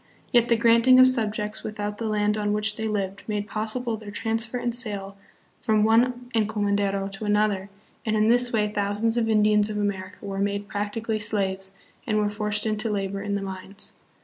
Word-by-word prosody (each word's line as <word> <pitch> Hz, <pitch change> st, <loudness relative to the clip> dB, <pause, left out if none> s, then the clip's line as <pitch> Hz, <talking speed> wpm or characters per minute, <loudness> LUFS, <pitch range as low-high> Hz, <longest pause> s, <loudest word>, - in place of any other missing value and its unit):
Yet 240 Hz, -2 st, +4 dB
the 235 Hz, -, +5 dB
granting 235 Hz, +2 st, +5 dB
of 255 Hz, -, +10 dB
subjects 215 Hz, -4 st, 0 dB
without 210 Hz, -1 st, -4 dB
the 225 Hz, -, -2 dB
land 210 Hz, 0 st, +1 dB
on 210 Hz, -1 st, 0 dB
which 210 Hz, 0 st, 0 dB
they 220 Hz, 0 st, -3 dB
lived 195 Hz, -2 st, -2 dB
made 210 Hz, -1 st, -2 dB
possible 220 Hz, +2 st, -2 dB
their 215 Hz, -1 st, -10 dB
transfer 225 Hz, +3 st, -2 dB
and 240 Hz, -1 st, -2 dB
sale 205 Hz, -5 st, -3 dB, 0.5 s
from 215 Hz, -1 st, +2 dB
one 245 Hz, +3 st, +2 dB
encomendero 205 Hz, -3 st, 0 dB
to 205 Hz, +2 st, -6 dB
another, 205 Hz, -2 st, +1 dB, 0.3 s
and 220 Hz, -1 st, 0 dB
hi 215 Hz, 0 st, +3 dB
this 245 Hz, +1 st, +3 dB
way 215 Hz, -2 st, +2 dB
thou 205 Hz, -1 st, -1 dB
sands 225 Hz, +2 st, 0 dB
of 230 Hz, -2 st, +1 dB
Indians 210 Hz, -1 st, +4 dB
of 210 Hz, -, -3 dB
America 200 Hz, -1 st, -3 dB
were 195 Hz, -1 st, -4 dB
made 200 Hz, 0 st, -1 dB
practically 215 Hz, +2 st, -2 dB
slaves, 195 Hz, -2 st, -2 dB, 0.3 s
and 215 Hz, -2 st, +1 dB
were 210 Hz, -1 st, +1 dB
forced 210 Hz, 0 st, -1 dB
into 215 Hz, +1 st, -1 dB
labor 195 Hz, -1 st, -2 dB
in 200 Hz, 0 st, -2 dB
the 200 Hz, -, -2 dB
mines. 190 Hz, +1 st, -6 dB
210 Hz, 190 wpm, -25 LUFS, 205-225 Hz, 0.5 s, of